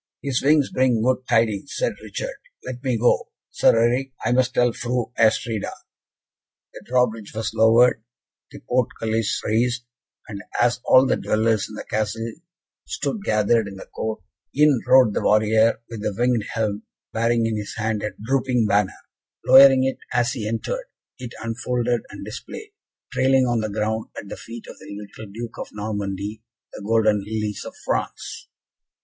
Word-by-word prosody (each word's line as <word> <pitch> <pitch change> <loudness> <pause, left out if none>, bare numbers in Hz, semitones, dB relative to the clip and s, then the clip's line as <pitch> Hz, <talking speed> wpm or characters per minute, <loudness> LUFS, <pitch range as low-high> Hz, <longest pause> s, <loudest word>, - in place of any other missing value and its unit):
"His 135 -3 0
wings 145 0 +3
bring 125 -4 +2
good 130 +1 0
tidings," 115 +1 +1
said - - 0
Richard. - - -5 0.3
"Let 125 0 -6
me 130 -3 0
go, 120 +2 +2 0.2
Sir 115 - +4
Eric, 125 +3 +1
I 115 - +2
must 130 +1 +2
tell 120 -1 +3
Fru 120 0 -2
Astrida." 110 -1 +1 1.0
The - - -10
drawbridge 115 -4 0
was 110 0 -3
lowered, 115 +2 +5 0.5
the - - -12
portcullis 115 -3 -1
raised, 120 +2 +1 0.4
and 100 -2 -7 0.2
as 120 +1 +3
all 130 +1 +6
the - - +1
dwellers 110 -1 +1
in 105 - -9
the - - -6
Castle 110 +2 -2 0.6
stood 215 -4 -3
gathered 110 - +2
in 100 - -8
the 95 - -10
court, 110 0 -5 0.3
in 150 -3 +5
rode 130 -5 +6
the - - -1
warrior 110 +1 +3
with 115 -3 -7
the 105 -2 -2
winged 120 -3 +1
helm, 105 -2 -1 0.3
bearing 115 0 +1
in 115 -1 0
his 105 -1 -5
hand 110 -1 -1
a 105 - -2 0.2
drooping 125 -2 +1
banner; 100 -2 +1 0.5
lowering 135 -1 +8
it 135 0 -1 0.2
as 120 0 +2
he 110 -5 -4
entered, 305 - -3 0.3
it 125 -2 -8
unfolded, 120 +1 -1
and - - -9
displayed, 435 -1 -8 0.4
trailing 130 0 +3
on 120 -2 +1
the 110 -1 -2
ground 110 +1 -2
at 100 - -7
the - - -5
feet 115 0 -10
of - - -12
the - - -13
little 105 0 -10
Duke 115 +2 -7
of - - -5
Normandy, 105 0 -4 0.3
the - - -8
golden 110 -1 +2
lilies 105 -1 -3
of - - -9
France. - - -3
115 Hz, 165 wpm, -23 LUFS, 110-125 Hz, 1.0 s, lowering